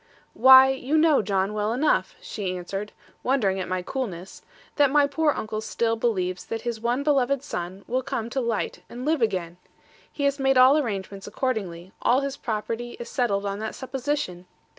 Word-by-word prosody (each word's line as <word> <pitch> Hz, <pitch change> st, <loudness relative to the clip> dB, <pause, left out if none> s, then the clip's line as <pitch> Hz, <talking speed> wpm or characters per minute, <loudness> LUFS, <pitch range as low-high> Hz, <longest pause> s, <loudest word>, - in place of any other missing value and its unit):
'Why, 260 Hz, +1 st, +8 dB
you 265 Hz, +3 st, 0 dB
know, 310 Hz, -2 st, +4 dB
John, 195 Hz, 0 st, 0 dB
well 210 Hz, +1 st, -1 dB
enough,' 290 Hz, +5 st, +1 dB
she 185 Hz, -4 st, -4 dB
answered, 195 Hz, +4 st, -5 dB, 0.3 s
wondering 215 Hz, -8 st, +1 dB
at 185 Hz, -, -3 dB
my 185 Hz, 0 st, -2 dB
coolness, 190 Hz, -7 st, -5 dB, 0.3 s
'that 285 Hz, -2 st, +4 dB
my 290 Hz, +1 st, +4 dB
poor 300 Hz, +2 st, +1 dB
uncle 215 Hz, -4 st, -4 dB
still 225 Hz, +1 st, -1 dB
believes 185 Hz, -6 st, -1 dB
that 225 Hz, 0 st, -4 dB
his 235 Hz, -2 st, -3 dB
one 240 Hz, +4 st, 0 dB
beloved 280 Hz, -2 st, +1 dB
son 185 Hz, -, -6 dB
will 255 Hz, +2 st, 0 dB
come 255 Hz, -4 st, -3 dB
to 270 Hz, -, -1 dB
light 230 Hz, -3 st, -2 dB
and 245 Hz, +2 st, -7 dB
live 310 Hz, -2 st, +1 dB
again. 180 Hz, -6 st, -1 dB, 0.5 s
He 285 Hz, -, -5 dB
has 280 Hz, 0 st, +1 dB
made 270 Hz, -1 st, +3 dB
all 255 Hz, +3 st, +7 dB
arrangements 200 Hz, -8 st, -3 dB
accordingly: 195 Hz, -7 st, -3 dB
all 255 Hz, +3 st, +3 dB
his 275 Hz, -1 st, -3 dB
property 230 Hz, +1 st, -4 dB
is 235 Hz, -, -7 dB
settled 205 Hz, -7 st, 0 dB
on 200 Hz, 0 st, -3 dB
that 220 Hz, 0 st, -4 dB
supposition. 260 Hz, -9 st, -3 dB
235 Hz, 180 wpm, -25 LUFS, 200-270 Hz, 0.5 s, Why